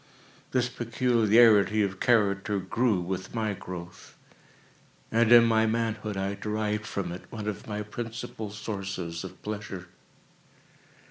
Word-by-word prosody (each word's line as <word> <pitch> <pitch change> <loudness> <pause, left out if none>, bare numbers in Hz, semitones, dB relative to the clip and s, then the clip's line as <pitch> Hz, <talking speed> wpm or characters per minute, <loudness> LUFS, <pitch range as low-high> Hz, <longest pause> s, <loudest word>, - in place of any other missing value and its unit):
This 125 -1 +1
peculiarity 115 -3 +4
of 95 -1 -3
character 105 -4 +2
grew 105 +2 +1
with 95 +4 -5
my 110 -2 0
growth, 90 -2 -9 1.0
and 115 +1 +3
in 120 -1 +9
my 110 -1 +3
manhood, 110 -2 -1
I 95 +1 -1
derived 105 +1 -2
from 100 -3 -3
it 90 +1 -9
one 105 -3 -5
of 105 -3 -4
my 105 -1 -3
principal 115 0 -6
sources 95 -5 -5
of - - -9
pleasure. 100 -4 -6
105 Hz, 125 wpm, -28 LUFS, 95-115 Hz, 1.0 s, in